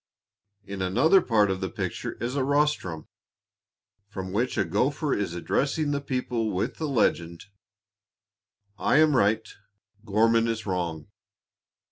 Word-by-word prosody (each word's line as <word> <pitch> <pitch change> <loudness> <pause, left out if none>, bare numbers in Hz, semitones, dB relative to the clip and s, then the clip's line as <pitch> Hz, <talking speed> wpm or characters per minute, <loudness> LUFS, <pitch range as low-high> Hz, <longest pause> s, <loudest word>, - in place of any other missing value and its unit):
In 100 -1 -6
another 125 - +4
part 105 -4 +2
of 95 0 -3
the 95 - -2
picture - - -4
is 120 +3 -4
a 140 - +1
rostrum, 140 - 0 1.0
from 95 -2 -6
which 120 +5 -1
a - - +2
gopher 135 - 0
is 100 -4 -2
addressing 145 - -1
the 140 0 -1
people 125 -4 -2
with 95 -2 -2
the 155 - -3
legend: 85 -9 0 1.3
"I 140 - +2
am 155 -2 +5
right; 110 -1 +2 0.6
Gorman 115 +2 +2
is 115 -1 -3
wrong." 85 -5 -3
115 Hz, 130 wpm, -26 LUFS, 95-140 Hz, 1.3 s, am